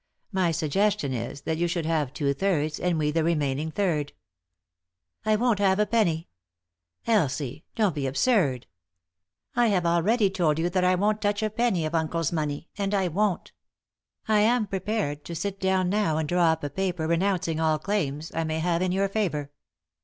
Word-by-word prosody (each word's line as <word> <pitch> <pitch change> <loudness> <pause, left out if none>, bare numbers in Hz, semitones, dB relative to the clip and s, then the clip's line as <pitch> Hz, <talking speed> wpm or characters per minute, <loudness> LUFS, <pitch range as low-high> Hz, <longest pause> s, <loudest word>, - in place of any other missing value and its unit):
My 190 -3 +1
sugges 185 +6 +1
tion 140 -2 -2
is 120 +3 -5
that 160 +2 -2
you 175 - +2
should 170 -1 -2
have 155 -5 0
two 140 -1 0
thirds 155 -3 0
and 180 -2 0
we 150 -1 +1
the 165 +1 +1
rem 165 -1 +1
ainin 140 +2 -1
g - - -4
third." 160 -8 0 0.6
" 85 - -45
I 215 - +4
won't 230 -1 +1
have 190 -1 +3
a 210 - +3
penny." 175 -8 +1 0.4
" 85 0 -50
Elsie 150 - 0
I— - - -57
don't 210 -6 +2
be 140 -2 -2
absurd." 140 - +1 0.5
" 85 +1 -62
I 240 0 +4
have 185 -5 +1
already 195 +5 +2
told 170 -6 +1
you 170 +2 0
that 185 0 +1
I 180 0 +4
won't 210 +3 +1
touch 205 +1 0
a 215 - 0
penny 220 -7 +1
of 155 - -3
uncle's 165 -1 0
money; 155 -1 -2
and 200 0 0
I 190 -2 +1
won't. 195 +2 -1 0.8
I 215 -1 +4
am 225 +2 +3
prepared 190 -6 -2
to 170 - -6
sit 195 +3 -3
down 190 -1 +1
now 200 -7 +1
and 160 -1 -1
draw 175 +2 +2
up 160 -1 -3
a 145 - -3
paper 180 -4 -2
renouncing 170 -1 0
all 160 -1 +2
claims 155 -4 -2
I 165 - -1
may 160 0 -2
have 170 +1 0
in 185 -1 +1
your 195 +2 +1
favour." 170 -9 -2
170 Hz, 205 wpm, -26 LUFS, 150-200 Hz, 0.8 s, I